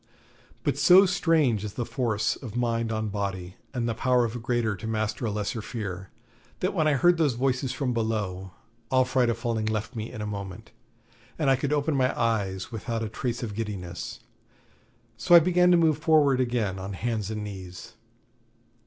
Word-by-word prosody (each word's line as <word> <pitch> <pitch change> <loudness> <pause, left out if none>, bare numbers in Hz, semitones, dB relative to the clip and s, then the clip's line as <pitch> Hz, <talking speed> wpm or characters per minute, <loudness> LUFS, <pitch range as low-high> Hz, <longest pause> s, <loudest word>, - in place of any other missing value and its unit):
But - - 0
so 185 +2 +7
strange 160 - +2
is 105 -1 -5
the 120 - -3
force 110 -5 0
of 120 -4 -9
mind 115 -2 0
on 110 -1 -2
body, 95 -3 -4
and 120 -3 -2
the 115 - 0
power 125 +1 +2
of 115 +1 -4
a - - -4
greater 115 -2 0
to 100 +4 -7
master 110 +1 -2
a - - -1
lesser 105 +3 -3
fear, 95 -5 -6 0.5
that 185 - -1
when 160 -5 +2
I 150 - +4
heard 175 +5 +4
those 145 -7 +2
voices 130 +1 0
from 130 -3 -2
below, 105 -5 -2 0.4
all 130 -1 +3
fright 125 -1 +2
of 115 - 0
falling 115 -2 -2
left 110 0 -2
me 110 0 -5
in - - -8
a 105 - -3
moment, 100 -3 -7 0.7
and 145 -4 +2
I - - +5
could 135 +2 -2
open 150 0 +1
my 130 -1 +1
eyes 100 -5 -1
without 115 0 -3
a 110 - -3
trace 120 +2 -3
of 110 -3 -4
giddiness. 100 -5 -5 1.0
So 120 +9 +5
I - - +11
began 180 +1 +3
to 175 - +6
move 160 -3 +3
forward 150 -4 +4
again 120 -7 0
on 95 +1 -5
hands 110 0 -2
and 110 -1 -4
knees. 95 +2 -8
115 Hz, 190 wpm, -26 LUFS, 105-130 Hz, 1.0 s, I